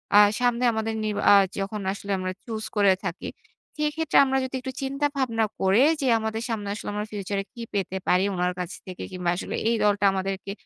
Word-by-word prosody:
আ - - +9 0.2
সামনে 245 0 +1
আমাদের 220 0 -2
নিরবা 210 -1 -1
আ - - +9 0.2
যখন 200 +1 -3
আসলে 200 0 -6
আমরা 185 0 -3
চুজ 220 -2 -4
করে 200 -2 +5
থাকি। - - -4 0.5
সেক্ষেত্রে 300 +1 0
আমরা 265 0 +1
যদি 260 0 -4
একটু 260 - -5
চিন্তা 275 +2 -1
ভাবনা 230 -4 +1
করে 195 +5 +4 0.2
যে, 270 - 0
আমাদের 220 0 -3
সামনে 210 -3 -3
আসলে 210 - -6
আমরা 210 0 -2
ফিউচারে 200 -1 -3
কি 235 - -9
পেতে 190 -1 -1
পারি 180 +1 +4
উনার 180 0 0
কাছ 180 -2 -4
থেকে? 185 -1 -7
কিংবা 180 -1 -2
আসলে - - -4
এই 235 - +2
দলটা 205 -1 +3
আমাদেরকে 195 +1 -3
210 Hz, 195 wpm, -25 LUFS, 195-235 Hz, 0.5 s, আ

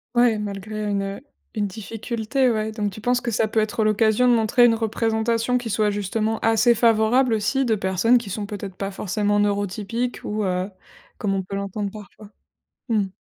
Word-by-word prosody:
Ouais, 240 -2 +4
malgré 210 +1 -5
une, 200 -1 0
heu 195 +5 -5 0.3
une 210 -2 -1
difficulté, 225 +4 -2
ouais 215 0 -1
donc 210 -2 -2
tu 215 - -10
penses 245 +1 +1
que 235 - -2
ça 220 +1 +1
peut 220 - 0
être 215 +1 0
l'occasion 215 +3 +3
de 245 - +5
montrer 235 +2 +4
une 230 - +5
représentation, 225 +2 0
qui 240 -2 -4
soit 210 0 +1
justement 215 +2 -1
assez 225 +2 +4
favorable 230 +2 +3
aussi 255 +5 +1
de 225 -2 +2
personnes, 190 +5 +2
qui 230 -4 -5
sont 205 +2 -3
peut-être 200 -2 -7
pas 195 +1 -3
forcément 205 +2 0
neurotypiques? 205 +4 -1
Ou, 210 0 -2
heu, 185 +1 -1 0.5
comme 200 -2 -1
on 190 - -1
peut 195 +2 -6
l'entendre 200 0 -3
parfois, 210 0 -12 0.6
mmh. 210 -4 +1
215 Hz, 185 wpm, -23 LUFS, 205-230 Hz, 0.6 s, de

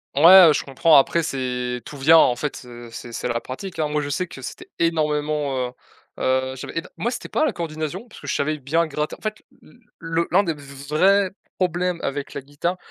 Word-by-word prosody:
Ouais, 175 +4 +9
heu, - - +5
je - - -1
comprends 145 +4 +3
après 165 +4 +3
c'est 125 -3 -3
tout 145 - -9
vient, 160 +4 +6
en 125 - +4
fait, 145 +3 -4
heu, 120 -1 -10
c'est 120 0 -8
c'est - - -3
la 120 -1 -1
pratique, 170 +8 -7
hein! 155 - +1
Moi 150 0 -1
je 145 - -4
sais 180 +5 -1
que 135 -6 -11
c'était - - -8
énormément, 150 -5 0
heu - - -13 0.5
heu, 130 0 0
j'avais 130 - -7
éno 165 - -3
moi 235 - -1
c'était 245 - -6
pas 310 - +1
la - - 0
coordination. 165 +6 -5
Parce - - -14
que - - -10
je - - -1
savais 155 +1 -1
bien 160 +5 +1
gratter 150 0 -3
en - - -28
fait 215 0 -4 0.2
l - - -19 0.2
le 165 0 -1
l'un 195 +3 +4
des 170 -4 -1
v 145 - -14 0.3
vrais 190 +5 +3 0.3
problèmes 180 -1 0
avec 140 +1 -4
la 140 - -4
guitare, 145 +6 -3
150 Hz, 230 wpm, -22 LUFS, 135-170 Hz, 0.5 s, Ouais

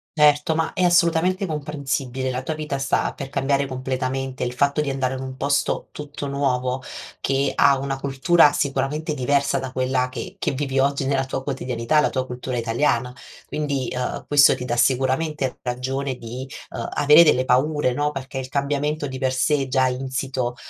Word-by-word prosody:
Certo, 150 +1 +4
ma 165 - -1
è 185 - -2
assolutamente 175 +2 +3
comprensibile, 140 -4 -3
la 125 - -3
tua 155 +4 -3
vita 150 -3 -3
sta 135 - 0
per 135 - -7
cambiare 140 0 0
completamente. 130 0 -3
Il 125 - -2
fatto 140 +4 +1
di 145 - -2
andare 135 -1 -1
in 130 - -5
un 130 0 -7
posto 140 +1 0
tutto 145 -1 -7
nuovo 130 -2 -1 0.4
che 135 0 +1
ha 140 -1 +4
una 135 0 -3
cultura, 145 +4 +4
sicuramente, 145 +2 -1
diversa 140 0 +1
da 130 -1 -5
quella 130 0 0
che - - -7
che - - 0
vivi 135 -1 -1
oggi 140 0 +1
nella 135 -1 +1
tua 130 0 -4
quotidianità, 130 0 0
la 150 - +3
tua 130 -1 -2
cultura 125 0 -5
italiana, 120 +1 0 0.3
quindi, 140 -4 -2
uhm, 125 - -3
questo 145 -1 +6
ti 125 - -6
dà 120 - -1
sicuramente 130 +3 +1
ragione 130 +2 -3
di, 125 +2 -7 0.2
uhm, - - -4
avere 150 +3 +7
delle 130 -5 +3
paure, 130 +1 +2
no, 145 +3 0
perché 135 -1 -6
il 130 0 -6
cambiamento 145 +2 -1
di 130 -2 -5
per 130 -1 0
sé 140 +1 +1
già 130 0 +2
insito, 130 -1 -2
135 Hz, 175 wpm, -22 LUFS, 130-145 Hz, 0.4 s, avere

